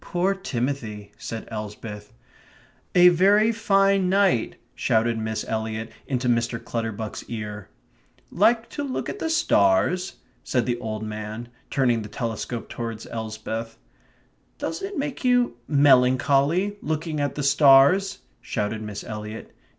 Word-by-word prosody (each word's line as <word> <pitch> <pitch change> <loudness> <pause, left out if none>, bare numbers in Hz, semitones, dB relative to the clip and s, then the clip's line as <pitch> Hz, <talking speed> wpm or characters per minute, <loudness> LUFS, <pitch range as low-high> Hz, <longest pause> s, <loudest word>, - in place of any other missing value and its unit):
"Poor 180 +3 0
Timothy," 125 - -4
said 115 -1 -6
Elsbeth. 105 -1 -7 0.8
"A 180 0 +8
very 200 +6 +4
fine 195 -4 +2
night," 190 - +2 0.2
shouted 115 -2 +1
Miss 110 0 -3
Eliot 110 0 -3 0.2
into 130 -2 -1
Mr. 115 0 +1
Clutterbuck's 110 -2 -4
ear. 105 -3 -6 0.6
"Like 225 +4 +3
to 290 - -4
look 270 -2 -3
at 415 - -6
the 325 - -2
stars?" 180 - +2 0.3
said 125 -3 0
the 120 -1 -1
old 110 -2 -4
man, 110 +2 -6 0.2
turning 120 -4 +2
the 105 - -8
telescope 115 +1 -4
towards 115 -2 -6
Elsbeth. 110 0 -5 0.8
"Doesn't 390 - -3
it 405 - -8
make 280 -1 -3
you 245 - +2
melancholy 140 +7 +3
looking 155 0 -2
at 145 -1 -1
the 145 - -3
stars?" 145 +7 +5 0.2
shouted 110 0 -3
Miss 105 -2 -6
Eliot. 105 0 -7
125 Hz, 125 wpm, -24 LUFS, 110-180 Hz, 0.8 s, A